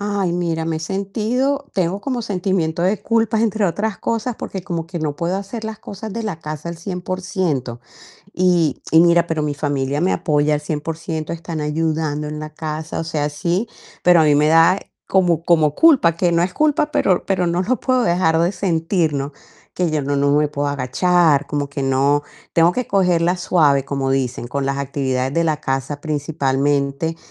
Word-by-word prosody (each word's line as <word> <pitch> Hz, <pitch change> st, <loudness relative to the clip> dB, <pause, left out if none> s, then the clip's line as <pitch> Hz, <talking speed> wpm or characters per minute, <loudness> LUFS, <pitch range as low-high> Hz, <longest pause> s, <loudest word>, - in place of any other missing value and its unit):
Ay, 200 Hz, -3 st, -1 dB
mira, 170 Hz, -2 st, -1 dB
me 160 Hz, -1 st, -1 dB
he -, -, -3 dB
sentido 220 Hz, -, -1 dB
tengo 185 Hz, +1 st, 0 dB
como 250 Hz, 0 st, -3 dB
sentimiento 180 Hz, -5 st, -1 dB
de 195 Hz, +3 st, +1 dB
culpa, 225 Hz, -1 st, +1 dB
entre 220 Hz, -2 st, +1 dB
otras 205 Hz, +4 st, -1 dB
cosas, 230 Hz, +1 st, -2 dB
porque 190 Hz, -2 st, -6 dB
como 170 Hz, -4 st, -4 dB
que 170 Hz, 0 st, -6 dB
no 150 Hz, -2 st, -2 dB
puedo 170 Hz, +4 st, -1 dB
hacer 205 Hz, +3 st, -6 dB
las 220 Hz, -1 st, -6 dB
cosas 205 Hz, +1 st, -7 dB
de 230 Hz, -, -4 dB
la 200 Hz, -7 st, -4 dB
casa 155 Hz, 0 st, -6 dB
al 170 Hz, -, -5 dB
100% 180 Hz, -8 st, -3 dB, 0.5 s
Y 175 Hz, -5 st, +2 dB
y 160 Hz, -, +6 dB
mira, 170 Hz, 0 st, +4 dB
pero 160 Hz, -2 st, -1 dB
mi 145 Hz, -1 st, -1 dB
familia 145 Hz, -1 st, -1 dB
me 180 Hz, +3 st, +2 dB
apoya 150 Hz, -1 st, +1 dB
al 150 Hz, -, -1 dB
100%, 155 Hz, +1 st, -4 dB
están 165 Hz, -1 st, -5 dB
ayudando 150 Hz, 0 st, -1 dB
en 150 Hz, 0 st, -5 dB
la 155 Hz, 0 st, -6 dB
casa, 155 Hz, +1 st, -5 dB
o -, -, -2 dB
sea, 150 Hz, -2 st, -1 dB
sí, 170 Hz, +9 st, -1 dB, 0.3 s
pero 175 Hz, -1 st, +6 dB
a -, -, +5 dB
mí 150 Hz, -1 st, +4 dB
me 150 Hz, +1 st, +3 dB
da 165 Hz, +4 st, +5 dB, 0.3 s
como 175 Hz, -4 st, +2 dB
como 155 Hz, -4 st, +3 dB
culpa, 265 Hz, -, +5 dB
que 175 Hz, 0 st, +1 dB
no 170 Hz, 0 st, +3 dB
es 180 Hz, +1 st, -1 dB
culpa, 300 Hz, 0 st, +2 dB
pero 185 Hz, -, +1 dB
pero 185 Hz, -2 st, 0 dB
no 175 Hz, +1 st, 0 dB
lo 245 Hz, +7 st, 0 dB
puedo 255 Hz, -1 st, +1 dB
dejar 170 Hz, -5 st, +2 dB
de 170 Hz, +1 st, +2 dB
sentir, 175 Hz, -3 st, 0 dB
¿no?, 140 Hz, 0 st, -3 dB, 0.4 s
que 180 Hz, -2 st, 0 dB
yo 150 Hz, -2 st, 0 dB
no 140 Hz, +1 st, -1 dB
no 140 Hz, 0 st, +2 dB
me 150 Hz, +1 st, +3 dB
puedo 145 Hz, 0 st, -2 dB
agachar, 145 Hz, +3 st, +2 dB
como 145 Hz, -1 st, -2 dB
que 140 Hz, -1 st, -4 dB
no 140 Hz, +2 st, +2 dB, 0.3 s
tengo 170 Hz, +1 st, +4 dB
que 250 Hz, +4 st, -3 dB
cogerla 180 Hz, -2 st, +2 dB
suave, 150 Hz, -6 st, +2 dB
como 135 Hz, -1 st, -2 dB
dicen, 130 Hz, -3 st, -1 dB
con 140 Hz, +2 st, -2 dB
las 140 Hz, 0 st, -1 dB
actividades 135 Hz, -2 st, -1 dB
de 170 Hz, -, +2 dB
la 155 Hz, -2 st, 0 dB
casa, 135 Hz, +1 st, -3 dB
principalmente, 145 Hz, 0 st, -1 dB
165 Hz, 195 wpm, -20 LUFS, 145-185 Hz, 0.5 s, y